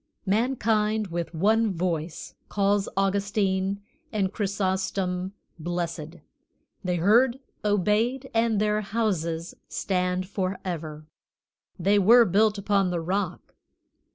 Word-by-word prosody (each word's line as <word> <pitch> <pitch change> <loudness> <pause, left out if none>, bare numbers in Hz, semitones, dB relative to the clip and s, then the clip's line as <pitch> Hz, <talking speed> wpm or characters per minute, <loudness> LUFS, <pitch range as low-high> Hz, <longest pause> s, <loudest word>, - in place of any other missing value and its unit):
Mankind 215 -1 +1
with 170 0 -3
one 215 +5 +3
voice 165 -2 -3 0.2
calls 200 0 +1
Augustine 195 0 0 0.3
and 200 -3 0
Chrysostom 190 -2 -1 0.3
blessed; 170 -1 -4 0.7
they 180 -1 0
heard, 235 +9 +4 0.3
obeyed, 210 +6 +1
and 225 -2 +2
their 210 0 +1
houses 180 -6 -2 0.2
stand 180 -1 -1
forever; 180 -6 -4 0.7
they 200 +3 +3
were 230 +5 +7
built 210 +2 +3
upon 200 -1 +1
the 175 -1 -1
rock. 185 +2 -3
195 Hz, 100 wpm, -26 LUFS, 180-210 Hz, 0.7 s, were